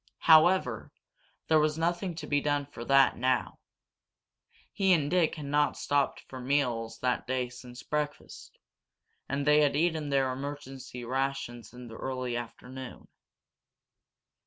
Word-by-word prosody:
However, 160 - +5 0.6
there 160 -1 +5
was 155 0 +1
nothing 175 +2 -1
to 160 -1 -6
be 145 -1 +1
done 145 -1 0
for 135 -4 -9
that 135 0 +4
now. 130 0 0 1.1
He 195 -2 +3
and 150 -3 +1
Dick 175 -3 +2
had 150 -3 -7
not 145 +1 +1
stopped 145 -1 0
for 130 - -10
meals 125 -4 -1
that 125 -1 0
day 130 -1 -1
since 125 0 -11
breakfast, 150 -1 -5 0.7
and 140 +1 -1
they 150 0 +5
had 145 -2 +2
eaten 160 -1 0
their 135 -2 +2
emergency 135 -2 -7
rations 130 -3 -3
in 125 0 -10
the 115 - -10
early 130 -2 -3
afternoon. 125 +2 -8
140 Hz, 135 wpm, -29 LUFS, 125-150 Hz, 1.1 s, However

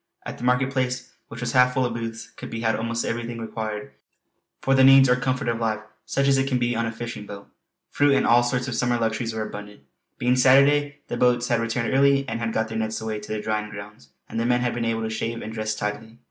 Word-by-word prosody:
At - - -7
the - - -8
market 125 +2 +2
place 130 -1 -2
which 115 +1 -9
was 120 -1 -2
half 125 0 +4
full 130 -1 +2
of 120 - -2
booths, 115 -1 -6
could - - -9
be 115 0 -5
had 110 -1 +1
almost 115 +1 -2
everything 120 0 -3
required 110 -2 -5 0.7
for 135 - +1
the 130 0 +5
needs 135 0 +8
or 125 - +4
comfort 130 +1 -2
of 115 -1 0
life 110 -2 -1 0.3
such 140 0 +1
as 135 -1 +4
it 135 - 0
can 130 - +1
be 120 0 0
on 115 0 0
a - - -3
fishing 115 -2 -7
boat. 100 -1 -9 0.4
Fruit 145 -1 +3
and 135 - +2
all 120 +1 +5
sorts 125 +1 -1
of 130 - -3
summer 120 +1 +1
luxuries 115 0 -1
were 110 -1 -3
abundant. 105 -4 -9 0.4
Being 125 +1 +2
Saturday 145 +3 +4
the 120 - -4
boats 125 0 +2
had 120 -1 +2
returned 115 +1 -1
early 140 0 +3
and 115 - -3
had 115 -1 -2
got 110 0 0
their 110 0 -4
nets 110 0 -2
away 110 -1 -4
to 105 - -9
the 110 - -2
drying 105 0 -2
grounds, 100 -8 -11 0.2
and - - -4
the 115 - 0
men 120 0 +2
had 125 -1 0
been 120 -1 -2
able 115 0 -1
to 110 - -2
shave 115 +1 -3
and 110 - -6
dress 110 -1 -2
tidily. 110 +2 -5
115 Hz, 255 wpm, -24 LUFS, 110-125 Hz, 0.7 s, needs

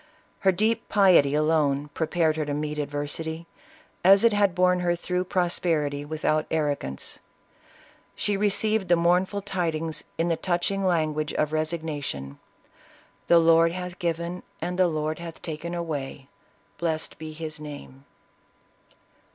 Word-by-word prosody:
Her 190 - +4
deep 215 +5 0
piety 180 -9 +5
alone 150 -2 +1
prepared 160 -1 +1
her 155 -1 -1
to 145 -1 -2
meet 150 0 -3
adversity, 150 +3 -3 0.6
as 195 +3 +7
it 230 -2 +5
had 200 -3 +2
borne 180 0 +3
her 175 -1 +1
through 180 +1 -2
prosperity, 165 -6 0
without 155 0 0
arrogance. 145 - -2 1.0
She 205 - -1
received 210 0 +1
the 175 - +5
mournful 180 +4 +1
tidings 165 -5 -2
in 165 - +1
the 170 - +2
touching 185 +3 -1
language 155 -4 0
of 150 0 0
resignation, 155 - -3 0.4
" - - -29
The 170 - +6
Lord 165 0 +5
hath 180 -1 -6
given, 170 +1 -2 0.2
and 180 +1 -3
the 185 - +5
Lord 155 -1 -2
hath 170 -1 -8
taken 170 +1 -5
away, 145 -5 -5 0.5
blessed 160 -2 -2
be 155 0 -6
his 155 0 -6
name 145 -2 -10
165 Hz, 135 wpm, -26 LUFS, 150-180 Hz, 1.0 s, as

